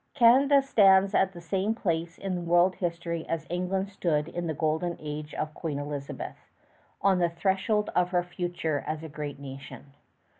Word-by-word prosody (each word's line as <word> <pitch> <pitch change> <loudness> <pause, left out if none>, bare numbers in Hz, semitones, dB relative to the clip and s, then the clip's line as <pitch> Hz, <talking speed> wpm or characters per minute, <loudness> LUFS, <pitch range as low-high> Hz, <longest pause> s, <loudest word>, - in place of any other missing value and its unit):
Canada 275 +3 +6
stands 195 -6 +5
at 190 -1 +3
the 175 - -10
same 195 +5 -1
place 170 -5 -2
in 195 -1 -3
the 175 - -2
world's 175 +2 +3
history 170 -2 -3
as 165 -1 -2
England 185 +2 -1
stood 165 -6 0
in 175 0 -4
the 160 - -1
Golden 160 +3 -1
Age 150 0 -6
of 155 0 -3
Queen 155 -3 -4
Elizabeth 145 -1 -6 0.5
on 195 -2 +4
the 175 -1 +3
threshold 195 +5 0
of 180 0 +3
her 180 -1 +1
future 175 -4 -3
as 155 0 -3
a 160 - -7
great 150 -1 -6
nation. 135 0 -10
175 Hz, 175 wpm, -28 LUFS, 155-190 Hz, 0.5 s, Canada